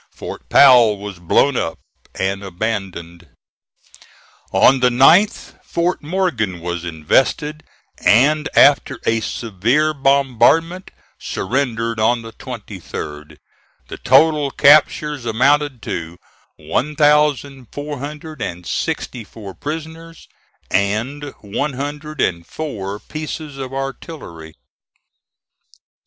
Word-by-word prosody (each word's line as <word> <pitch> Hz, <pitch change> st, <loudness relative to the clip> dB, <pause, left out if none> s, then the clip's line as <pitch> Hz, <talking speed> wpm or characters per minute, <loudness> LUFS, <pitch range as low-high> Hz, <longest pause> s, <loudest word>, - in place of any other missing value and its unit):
Fort -, -, -9 dB
Powell 120 Hz, -6 st, +6 dB
was 100 Hz, -2 st, -8 dB
blown 125 Hz, +10 st, +2 dB
up 80 Hz, -, -2 dB, 0.4 s
and 95 Hz, +1 st, -2 dB
abandoned. 90 Hz, -4 st, -5 dB, 1.2 s
On 135 Hz, -, +5 dB
the 125 Hz, 0 st, +4 dB
9th, 165 Hz, -, +3 dB
Fort 175 Hz, +2 st, -1 dB
Morgan 145 Hz, -, -1 dB
was 85 Hz, 0 st, -4 dB
invested, 130 Hz, -, 0 dB, 0.4 s
and, 145 Hz, +7 st, +4 dB
after 140 Hz, -3 st, +4 dB
a 115 Hz, 0 st, +2 dB
severe 115 Hz, +8 st, 0 dB
bombardment, 140 Hz, +6 st, +2 dB, 0.3 s
surrendered 115 Hz, -1 st, -2 dB
on 115 Hz, +2 st, +2 dB
the 115 Hz, 0 st, -10 dB
23d. 75 Hz, -7 st, -8 dB, 0.5 s
The -, -, -7 dB
total 150 Hz, +2 st, +4 dB
captures 150 Hz, 0 st, +4 dB
amounted 135 Hz, +2 st, +1 dB
to 85 Hz, +1 st, -5 dB, 0.4 s
one 150 Hz, +3 st, -2 dB
thousand 145 Hz, -4 st, +2 dB
four 145 Hz, -1 st, -6 dB
hundred 150 Hz, 0 st, -8 dB
and 85 Hz, -2 st, -5 dB
sixty 120 Hz, +6 st, -3 dB
four 100 Hz, -2 st, -11 dB
prisoners, 160 Hz, -, -8 dB, 0.4 s
and 115 Hz, +9 st, -1 dB
one 135 Hz, +8 st, -3 dB
hundred 145 Hz, +3 st, -6 dB
and 85 Hz, -2 st, 0 dB
four 100 Hz, -, -6 dB
pieces 155 Hz, +2 st, -7 dB
of 130 Hz, -1 st, -5 dB
artillery. 135 Hz, -, -7 dB
130 Hz, 100 wpm, -19 LUFS, 105-150 Hz, 1.2 s, Powell